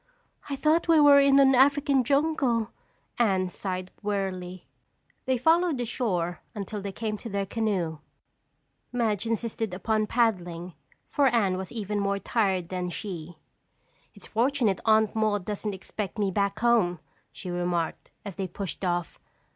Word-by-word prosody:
"I 280 - -1
thought 310 +5 +2
we 330 -2 +6
were 290 -1 +8
in 275 0 +5
an 270 -1 +6
African 275 +1 +4
jungle," 270 -5 +1 0.5
Anne 190 -5 +2
sighed 185 0 -5
wearily. 185 -3 -3 0.6
They 260 -1 +1
followed 325 +3 +3
the 245 - -2
shore 180 -8 -2
until 205 0 -5
they 200 0 -4
came 215 +2 -3
to 230 - -8
their 200 -1 -1
canoe. 190 -7 -1 0.9
Madge 225 -3 0
insisted 225 -3 -2
upon 215 +2 0
paddling 180 -7 0 0.3
for 285 -2 +2
Anne 220 -7 +2
was 185 -1 -5
even 210 -3 -3
more 200 0 0
tired 195 -5 0
than 180 -1 -3
she. 175 -4 -7 0.8
"It's - - -12
fortunate 235 -3 +1
Aunt 220 -1 +3
Maude 210 -3 0
doesn't 210 -1 -3
expect 195 +2 -6
me 200 -2 0
back 200 +1 0
home," 220 -7 +2 0.3
she 180 - -7
remarked 175 -2 -2 0.2
as 195 -3 -7
they 190 -2 -2
pushed 190 +1 -6
off. 175 -2 -2
210 Hz, 145 wpm, -27 LUFS, 185-240 Hz, 0.9 s, were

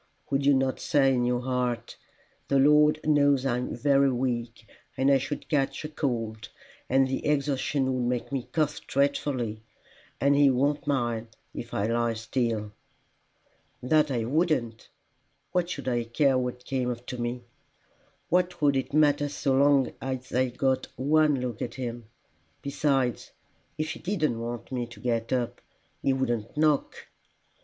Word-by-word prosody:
"Would 140 0 +1
you 145 - +6
not 130 0 0
say 135 -2 +3
in 125 -1 +1
your 125 0 0
heart, 125 -2 -2 0.5
'The 140 - +2
Lord 150 +2 +5
knows 145 -3 +3
I 125 -2 +1
am 125 - -4
very 140 +2 +3
weak, 120 -2 -3 0.3
and 135 +1 +3
I 135 - +5
should 145 +3 -5
catch 145 0 0
cold, 115 -6 -2 0.4
and 135 +1 +4
the 130 - -3
exertion 140 -2 0
would 125 -1 -1
make 125 +1 -2
me 135 -3 -3
cough 155 -2 0
dreadfully, 135 -5 0 0.6
and 140 +1 +3
he 140 -1 +6
won't 145 +3 +1
mind 120 -5 0 0.3
if 115 - -7
I 100 - -1
lie 115 0 0
still?'" 115 -2 -2 1.1
"That 150 +3 +3
I 120 -4 -1
wouldn't! 130 -6 0 0.6
What 175 -1 0
should 140 -6 -5
I 120 -2 0
care 135 +4 +2
what 125 -1 -2
came 125 -2 -1
to 125 +1 -8
me? 120 +1 -3 0.9
What 180 0 +1
would 145 -2 +3
it 135 +1 -2
matter 145 -1 +3
so 140 -1 -1
long 140 -1 +4
as 130 -1 -5
I 130 +1 +2
got 130 +2 0
one 150 +1 +3
look 120 -3 -4
at 115 - -4
him! 120 -3 -5 0.6
Besides, 135 -3 0 0.5
if 155 0 -2
he - - -7
didn't 155 - -1
want 120 +2 -6
me 125 -2 -2
to 115 -3 -13
get 115 -1 -1
up, 125 -2 -1 0.4
he 135 - +2
wouldn't 125 -3 -2
knock." 150 -2 +1
130 Hz, 155 wpm, -27 LUFS, 120-145 Hz, 1.1 s, you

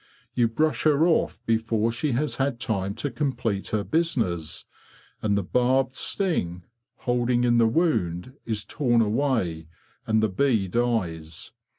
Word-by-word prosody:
You 120 -2 +3
brush 155 +7 0
her 155 +1 +4
off 170 -2 +1
before 115 0 +1
she 125 +4 -1
has 145 +5 -1
had 135 -3 0
time 100 -4 -2
to 140 +4 -3
complete 120 -6 -2
her 105 -2 -1
business, 105 - -1 0.6
and 100 -2 +1
the 100 - 0
barbed 130 +5 +1
sting, 90 - -1 0.4
holding 120 0 +1
in 120 -1 +3
the 115 - +5
wound, 110 - 0
is 110 -2 -3
torn 120 -5 +2
away, 105 - 0 0.4
and 110 0 +2
the - - +4
bee 110 -1 +1
dies. 90 -8 -2
115 Hz, 145 wpm, -25 LUFS, 100-135 Hz, 0.6 s, the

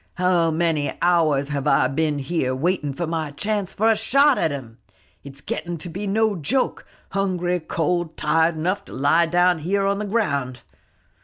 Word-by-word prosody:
How 180 -2 +2
many 160 -2 0
hours 155 -5 +2
have 145 -1 -2
I - - +4
been 150 +1 -1
here 135 -2 -1
waiting 155 0 -1
for 170 +6 -3
my 160 -2 -3
chance 200 +6 -2
for 220 - +2
a 225 - +5
shot 275 +6 +3
at - - +2
him? 125 -5 -7 0.4
It's 140 0 -11
getting 170 +2 -4
to 170 +3 -7
be 195 +5 -5
no 215 +1 +1
joke, 180 - -1 0.2
hungry, 180 -2 0
cold, 165 +1 -2
tired 160 +2 +2
enough 180 +5 -1
to - - -12
lie 160 +5 +3
down 175 0 +3
here 195 +5 0
on 200 0 0
the 210 - -3
ground. 140 - -1
170 Hz, 175 wpm, -22 LUFS, 150-190 Hz, 0.4 s, a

